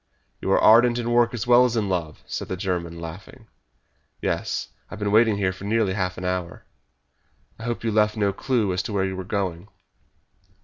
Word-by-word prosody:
"You - - -1
are - - +4
ardent 120 +2 +6
in 120 0 -2
work 120 0 +4
as 120 -1 -4
well 120 +1 +6
as 120 -2 +1
in 105 -3 0
love!" 85 -5 -3
said - - -5
the 95 - -4
German, 85 -2 -3
laughing. 95 +9 -10 0.7
"Yes; - - -2 0.2
I - - -10
have - - -6
been 105 -1 -1
waiting 110 -1 +4
here 95 -2 0
for 95 +1 -10
nearly 105 -2 +1
half 95 -2 -2
an 90 - -5
hour." 90 -1 -3 0.9
"I 115 - -7
hope 120 -1 -3
you 115 - 0
left 105 0 +2
no 100 -2 +1
clue 115 -7 0
as 90 - 0
to 110 - -6
where 95 -1 +1
we 95 - -3
were 95 0 -5
going." 95 -2 -3
100 Hz, 210 wpm, -24 LUFS, 95-115 Hz, 0.9 s, ardent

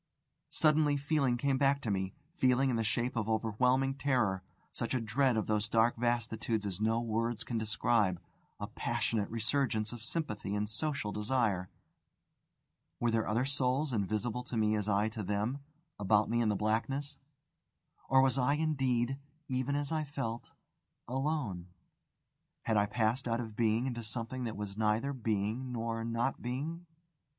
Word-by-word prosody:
Suddenly 150 -2 +3
feeling 140 -3 +1
came 135 +1 +1
back 140 0 +3
to 110 - -1
me 95 -1 -2 0.2
feeling 130 -4 +3
in - - 0
the 115 - +1
shape 120 +3 0
of 110 -1 -1
overwhelming 125 +5 +2
terror; 125 -9 +1 0.3
such - - -2
a - - +2
dread 120 +2 +2
of 110 - 0
those 105 -1 0
dark 115 +1 +4
vastitudes 115 -2 0
as 100 0 -4
no 110 +1 +2
words 115 0 -1
can 115 -2 -2
describe, 110 -4 +1 0.4
a - - -3
passionate 105 -3 -1
resurgence 115 -1 0
of 120 -2 -8
sympathy 110 - -3
and 105 +1 0
social 140 -3 -2
desire. 105 -4 0 1.3
Were 120 -1 +2
there 115 -1 +1
other 115 +4 +1
souls, 135 +1 0
invisible 110 +3 -1
to 120 - -4
me 110 -1 +3
as 105 0 -1
I 105 +1 +3
to 110 0 -5
them, 105 +7 -1 0.4
about 105 +2 +3
me 120 0 +2
in 110 - +2
the 105 - +1
blackness? 120 +8 -1 0.9
or 135 0 +6
was 135 0 +3
I 130 +3 +3
indeed, 135 -4 +1 0.3
even 130 +2 0
as 145 0 -2
I 155 -1 0
felt, 135 -5 -4 0.6
alone? 130 - -2 1.0
Had 110 - +1
I 105 0 +3
passed 120 +4 0
out 115 0 0
of 110 -3 -5
being 115 +1 +2
into 120 -3 -2
something 115 +3 -4
that 110 -3 -4
was 105 -1 -5
neither 110 +6 +1
being 115 +1 -1
nor 115 -1 -2
not 115 +3 -1
being? 155 +8 -4
115 Hz, 160 wpm, -33 LUFS, 110-135 Hz, 1.3 s, or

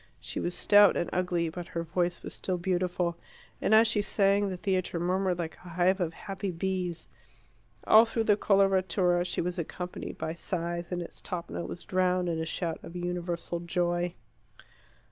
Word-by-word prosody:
She 120 +1 -5
was 175 - -2
stout 205 -1 +6
and 170 - -2
ugly; 175 -2 0
but 175 +1 -7
her 165 - 0
voice 175 +1 -1
was - - -5
still 185 -1 -2
beautiful, 175 -1 -1 0.4
and - - 0
as 225 +1 +7
she 215 -2 +2
sang 200 -1 +2
the 185 - -4
theatre 185 -2 -1
murmured 180 +1 +1
like 165 -2 -4
a 180 - -13
hive 180 +3 +2
of 170 -3 -1
happy 195 0 -5
bees. 180 -1 -2 0.8
All 220 +2 +8
through 225 0 -1
the 210 -2 +4
coloratura 190 -3 +3
she 180 - -1
was 180 +1 -2
accompanied 180 +2 -5
by 160 - -3
sighs, 170 0 -3
and 175 -1 -2
its - - -9
top 175 -2 -5
note - - -4
was 175 - -7
drowned 180 -1 +1
in 165 -1 -1
a 160 - -2
shout 165 0 -3
of 170 - -10
universal 175 -1 -3
joy. 175 0 -1
180 Hz, 180 wpm, -29 LUFS, 170-190 Hz, 0.8 s, All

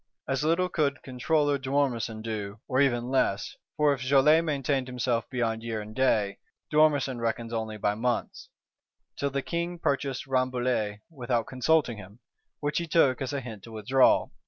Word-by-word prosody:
As 135 +1 -1
little 170 +4 +2
could 145 -6 -1
Controller 145 +3 +1
d'Ormesson 130 -5 -1
do, 105 -2 -5
or 130 +1 +2
even 125 -2 +1
less; 115 -7 0 0.2
for 150 -1 +4
if 135 - -6
Joly 140 +4 +5
maintained 140 -4 -1
himself 125 -2 -1
beyond 115 -3 -1
year 115 -1 -3
and 105 +1 -8
day, 110 -6 +1 0.3
d'Ormesson 145 -4 +3
reckons 115 0 -2
only 110 -1 -3
by 105 0 0
months: 120 +3 -2 0.7
till 140 - -1
"the 140 0 -2
King 170 +1 -3
purchased 140 -4 -1
Rambouillet 125 -5 0
without 120 -5 -1
consulting 130 -1 +1
him," 100 +1 -12 0.4
which 145 +2 0
he 170 - -4
took 145 -5 +3
as 135 - -2
a 140 -1 -2
hint 110 -5 -8
to 115 - -12
withdraw. 115 +5 +3
130 Hz, 160 wpm, -27 LUFS, 115-140 Hz, 0.7 s, Joly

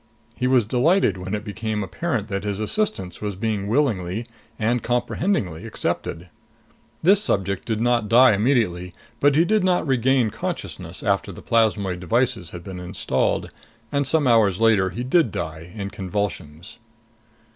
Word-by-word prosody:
He 125 - -1
was 125 -4 +4
delighted 130 - +2
when 95 +3 -3
it 105 - -5
became 105 0 -3
apparent 115 - -2
that 100 -2 -3
his 100 -1 -3
assistance 110 - -2
was 105 -2 -3
being 105 -1 -2
willingly 110 -5 0 0.3
and 120 +2 0
comprehendingly 120 - -1
accepted. 85 +2 -3 0.7
This 195 +4 +5
subject 100 - -1
did 110 -2 -1
not 120 -2 +1
die 125 +2 +7
immediately. 100 -6 0 0.2
But 145 0 +4
he 165 +3 +4
did 215 +1 +2
not 180 -2 +2
regain 130 -3 +2
consciousness - - -5
after - - 0
the - - -11
plasmoid 105 -5 +1
devices 90 -1 0
had 85 0 -9
been 95 -1 -7
installed; 90 -7 -1 0.4
and 140 -1 0
some 155 0 +2
hours 110 -6 +4
later 110 -4 +4
he 120 +6 -5
did 130 - +2
die, 80 +1 -5
in 100 -2 -5
convulsions. 95 -2 -5
110 Hz, 150 wpm, -23 LUFS, 95-125 Hz, 0.7 s, die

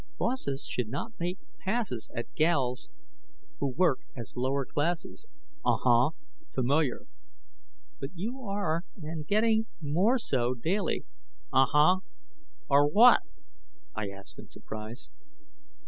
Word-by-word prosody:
"Bosses 140 - -1
should 120 -4 -2
not 185 - -4
make 175 +2 -2 0.2
passes 190 - -2
At 120 - -5
gals 140 -5 +1 0.7
who 140 - +1
work 150 0 +2 0.2
as 120 -2 -6
lower 130 +2 0
classes." 170 - -2 0.4
"Uh, - - +3
huh, 120 +2 +4 0.5
familiar." 135 +1 +1 1.0
"But 135 - -4
you 230 +9 -4
are, 195 -7 -1 0.2
and 155 -2 -6
getting 220 +1 +3
more 175 - +2
so 125 - 0
daily 180 - -1 0.2
" 410 -4 -35
"Uh 135 0 +6
hu 155 +6 +5 0.7
are 145 +1 +5
what?" 230 +10 +7 0.7
I 105 -2 -3
asked 100 0 -10
in - - -11
surprise. 110 +2 -8
150 Hz, 120 wpm, -29 LUFS, 130-195 Hz, 1.0 s, what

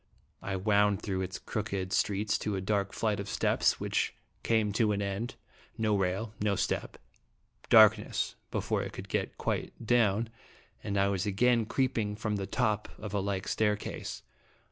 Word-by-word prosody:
I 95 - -3
wound 100 0 +2
through 95 -2 -1
its 95 0 -4
crooked 100 -3 -3
streets 105 +1 +1
to 105 - -2
a - - -1
dark 100 +1 0
flight 105 -3 0
of 100 0 -5
steps, - - +2
which - - -1 0.3
came 110 -2 +2
to 105 -1 +2
an 100 - -1
end; 100 +4 -3 0.4
no 110 -2 +2
rail, 100 +3 -1
no 105 -1 +2
step, - - -2 0.7
darkness 110 -1 +5 0.2
before - - -1
I - - -4
could - - -8
get - - -2
quite - - -2
down; 115 -1 +3 0.5
and 100 -1 -2
I 100 0 +4
was 100 +1 -1
again 115 +2 +3
creep 130 -1 +1
ing 105 -1 -1
from 105 -1 -2
the 95 -1 -3
top 105 0 0
of 105 -2 -7
a 100 - +1
like 100 0 -2
staircase. 105 -1 -1
105 Hz, 165 wpm, -30 LUFS, 100-110 Hz, 0.7 s, darkness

